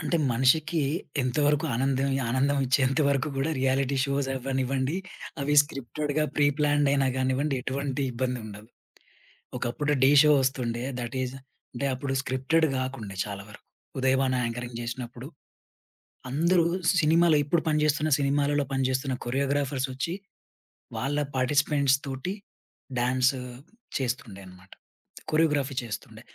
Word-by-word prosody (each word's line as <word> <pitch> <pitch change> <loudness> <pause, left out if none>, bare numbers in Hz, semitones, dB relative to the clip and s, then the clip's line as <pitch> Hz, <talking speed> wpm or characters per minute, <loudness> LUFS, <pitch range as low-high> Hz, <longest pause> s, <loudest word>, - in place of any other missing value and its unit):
అంటే, 170 +1 0 0.2
మనిషికి 155 +7 +2 0.4
ఎంతవరకు 145 +4 +1
ఆనందం 135 +2 +1 0.2
ఆనందమిచ్చేంత 135 +1 +2
వరకు 140 +1 +1
కూడా 135 +4 0
రియాలిటీ 135 +1 +1
షోస్ 140 -1 -1
అవ్వనివ్వండి 130 +2 -1 0.4
అవి 145 +1 +1
స్క్రిప్టెడ్‌గా 145 +1 -3
ప్రి 145 - +4
ప్లాన్డ్ 145 -1 +3
అయినా 140 -1 +2
గానివ్వండి, 130 +2 0
ఎటువంటి 140 +1 -2
ఇబ్బందుండదు. 115 -4 -4 0.9
ఒకప్పుడు 145 +5 -1
'ఢీ' 135 +2 +6
షో 150 0 +5
వస్తుండే 125 -3 -1 0.2
థటీజ్ 125 +1 -3 0.4
అంటే, 140 +3 -2
అప్పుడు 135 +1 -3
స్క్రిప్టెడ్ 135 +6 +1
గాకుండే 130 -6 -4
చాలా 100 -1 -6
వరకు. 105 - -14 0.3
ఉదయబాను 130 0 +2
యాంకరింగ్ 120 0 -4
జేసినప్పుడు 120 +1 -6 1.0
అందరూ 170 +6 +3 0.4
సినిమాలో 160 0 +4
ఇప్పుడు 160 +3 +1
పనిచేస్తున్న 150 0 +2
సినిమాలలో 145 +1 +1
పనిచేస్తున్న 130 0 0
కొరియోగ్రాఫర్సొచ్చి 135 +2 -1 0.8
వాళ్ళ 145 +3 -1 0.2
పార్టిసిపెంట్స్‌తోటి 140 +2 +1 0.7
డాన్స్ 130 +2 +2 0.7
చేస్తుండే 120 -6 -4
అన్నమాట 90 +1 -16 0.6
కొరియోగ్రఫీ 150 -4 +2
చేస్తుండే. 110 -4 -7
135 Hz, 105 wpm, -27 LUFS, 130-145 Hz, 1.0 s, ఢీ